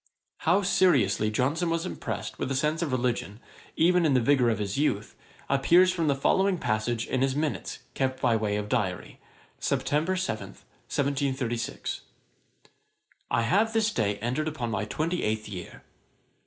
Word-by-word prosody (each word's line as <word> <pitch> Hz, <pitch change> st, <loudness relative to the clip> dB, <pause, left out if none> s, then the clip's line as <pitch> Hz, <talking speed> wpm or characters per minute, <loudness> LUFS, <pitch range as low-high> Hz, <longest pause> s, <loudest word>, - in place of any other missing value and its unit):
] -, -, -57 dB
How 195 Hz, +4 st, +4 dB
seriously 135 Hz, -, +3 dB
Johnson 145 Hz, +10 st, 0 dB
was 165 Hz, +1 st, -1 dB
impressed 120 Hz, -, -5 dB
with -, -, -2 dB
a 135 Hz, -, -1 dB
sense 150 Hz, +5 st, 0 dB
of 160 Hz, -5 st, -1 dB
religion, 120 Hz, -4 st, -1 dB, 0.4 s
even 180 Hz, +2 st, +4 dB
in 150 Hz, -4 st, +3 dB
the -, -, +5 dB
vigour 125 Hz, 0 st, +3 dB
of 110 Hz, -, +1 dB
his 100 Hz, -1 st, -3 dB
youth, 110 Hz, -7 st, 0 dB, 0.3 s
appears 170 Hz, +7 st, +5 dB
from 165 Hz, -3 st, 0 dB
the 140 Hz, -, +3 dB
following 190 Hz, +7 st, +2 dB
passage 110 Hz, -2 st, -1 dB
in 130 Hz, -, -1 dB
his 135 Hz, 0 st, +1 dB
minutes 150 Hz, 0 st, -2 dB, 0.2 s
kept 130 Hz, -1 st, -1 dB
by 120 Hz, -, +2 dB
way 105 Hz, -2 st, 0 dB
of 105 Hz, 0 st, -2 dB
diary: 105 Hz, -6 st, -2 dB, 0.4 s
Sept. -, -, -1 dB, 0.3 s
7, 180 Hz, -13 st, -2 dB
1736. 135 Hz, -4 st, -3 dB, 1.3 s
I 115 Hz, -, +1 dB
have 210 Hz, -, +2 dB
this 220 Hz, -1 st, +2 dB
day 105 Hz, -3 st, 0 dB
entered 130 Hz, +7 st, -1 dB
upon 130 Hz, -7 st, -3 dB
my 105 Hz, 0 st, -1 dB
twenty 165 Hz, +10 st, -2 dB
eighth 110 Hz, 0 st, -1 dB
year. 95 Hz, -4 st, -8 dB
130 Hz, 160 wpm, -27 LUFS, 110-160 Hz, 1.3 s, the